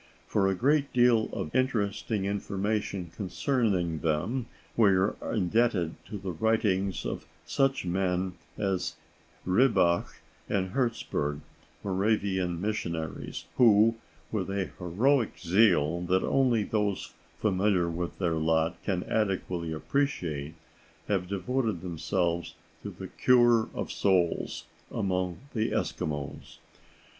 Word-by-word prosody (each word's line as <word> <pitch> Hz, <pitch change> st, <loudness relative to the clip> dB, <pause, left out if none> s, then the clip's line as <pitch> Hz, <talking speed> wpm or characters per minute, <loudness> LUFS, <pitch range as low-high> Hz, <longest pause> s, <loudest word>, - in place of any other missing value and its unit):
For 100 Hz, -2 st, +1 dB
a 95 Hz, -, +1 dB
great 140 Hz, +6 st, +2 dB
deal 120 Hz, -3 st, +4 dB
of 75 Hz, -, -5 dB
interesting 110 Hz, -5 st, 0 dB
information 100 Hz, -2 st, -2 dB
concerning 100 Hz, -, 0 dB
them 90 Hz, +12 st, -1 dB, 0.3 s
we 110 Hz, -3 st, +5 dB
are 95 Hz, +3 st, +2 dB
indebted 105 Hz, -4 st, +1 dB
to 105 Hz, -, -5 dB
the 95 Hz, -1 st, -4 dB
writings 100 Hz, 0 st, +1 dB
of -, -, -4 dB, 0.2 s
such 135 Hz, -6 st, +1 dB
men 90 Hz, 0 st, 0 dB, 0.2 s
as 95 Hz, -3 st, -1 dB, 0.5 s
Ribbach 90 Hz, -4 st, +3 dB, 0.4 s
and 95 Hz, -2 st, 0 dB
Herzeburg, 75 Hz, -, -1 dB, 0.4 s
Moravian 95 Hz, -3 st, 0 dB
missionaries, 85 Hz, -6 st, -3 dB
who, 115 Hz, -2 st, +6 dB, 0.4 s
with 100 Hz, -4 st, -2 dB
a 100 Hz, -1 st, -2 dB
heroic 115 Hz, +9 st, +1 dB
zeal 85 Hz, -3 st, +3 dB
that 95 Hz, +1 st, +2 dB
only 125 Hz, -5 st, +2 dB
those 105 Hz, -1 st, -1 dB, 0.2 s
familiar 95 Hz, -3 st, +2 dB
with 85 Hz, +1 st, -3 dB
their 85 Hz, -3 st, 0 dB
lot 80 Hz, +1 st, +1 dB
can 90 Hz, -3 st, -1 dB
adequately 95 Hz, -5 st, -1 dB
appreciate, 80 Hz, -, -2 dB, 0.5 s
have 95 Hz, -3 st, 0 dB
devoted 100 Hz, +1 st, -1 dB
themselves 85 Hz, -1 st, -1 dB, 0.3 s
to 105 Hz, -, -5 dB
"the 95 Hz, 0 st, -8 dB
cure 120 Hz, -3 st, +4 dB
of -, -, -3 dB
souls" 90 Hz, -4 st, +1 dB, 0.3 s
among 90 Hz, -2 st, -1 dB
the 110 Hz, -2 st, 0 dB
Eskimos. 75 Hz, +1 st, -3 dB
95 Hz, 110 wpm, -29 LUFS, 85-110 Hz, 0.5 s, who